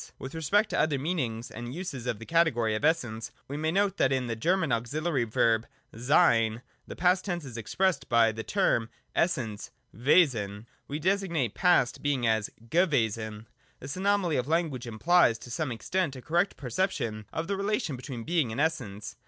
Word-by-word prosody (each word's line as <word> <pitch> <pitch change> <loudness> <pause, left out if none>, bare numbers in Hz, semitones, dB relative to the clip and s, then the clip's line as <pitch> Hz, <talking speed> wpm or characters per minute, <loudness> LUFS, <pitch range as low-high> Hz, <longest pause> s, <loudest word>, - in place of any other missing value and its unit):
With 135 - -8
respect 200 +7 +1
to - - 0
other 150 -3 +2
meanings 130 -7 -2
and 120 +3 -7
uses 140 -9 -5
of 115 - -1
the 115 - -10
category 135 -10 +2
of 110 - -3
Essence, 120 -8 0 0.2
we 140 - -5
may 155 +2 -1
note 200 +1 +1
that 135 - +3
in 130 -1 +1
the 115 -1 -3
German 180 - +1
auxihary 135 +4 0
verb 115 +1 +2 0.3
'sc/« 115 -3 +3
' - - -40
the - - -7
past 180 +2 +3
tense 175 -5 -3
is 125 -4 -9
expressed 180 - -1
by 115 -1 +5
the 110 +1 -5
term 115 - +1
for - - -35 0.3
Essence 125 - -1 0.3
{IVesen): 115 - +2 0.2
we 145 - -3
designate 170 - 0
past 175 -9 +2
being 140 -4 0
as 110 -2 +1 0.2
gewesen. 110 - 0 0.3
This 135 +2 -6
anomaly 190 -3 +1
of 125 - -1
language 155 -7 -1
implies 120 +2 +3
to 120 - -11
some 140 +3 -2
ex 115 - -7
tent 180 -7 0
a 130 - -8
correct 175 +5 +1
perception 115 - -2
of 160 - -3
the 200 - -1
relation 200 - -1
between 125 -2 -7
Being 160 -5 0
and 115 - -4
Essence. 125 -11 -2
135 Hz, 185 wpm, -28 LUFS, 115-170 Hz, 0.3 s, by